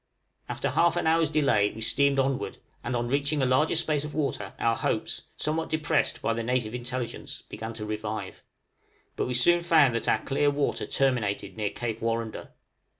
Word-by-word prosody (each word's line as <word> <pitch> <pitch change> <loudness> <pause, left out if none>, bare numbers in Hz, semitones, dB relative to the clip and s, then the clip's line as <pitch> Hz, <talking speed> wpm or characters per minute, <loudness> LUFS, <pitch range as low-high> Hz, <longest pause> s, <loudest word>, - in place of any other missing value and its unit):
After - - -2
half 170 0 +3
an - - 0
hour's 160 -1 +3
delay 140 -10 +3
we 110 - -9
steamed 140 +5 +2
onward, 135 0 0 0.3
and 120 +1 -2
on 120 0 -1
reaching 140 +2 0
a - - +4
larger 130 +6 +3
space 155 -3 +1
of 150 - -6
water 135 -10 -2
our 115 0 +2
hopes - - -2
(somewhat 160 +2 -1
depressed 155 -1 0
by 115 - +2
the 115 - -2
native 120 -1 -1
intelligence) 125 0 -5
began 110 +1 -6
to 110 -2 -5
revive. 105 -2 -4 0.7
But - - -1
we 125 - -1
soon 175 +8 +5
found 160 -7 +5
that 115 - -1
our - - +2
clear 145 +1 +2
water 145 0 -1
terminated 105 -7 0
near 105 -2 -1
Cape 115 0 -4
Warrender. 115 -1 -2
125 Hz, 180 wpm, -27 LUFS, 115-150 Hz, 0.7 s, soon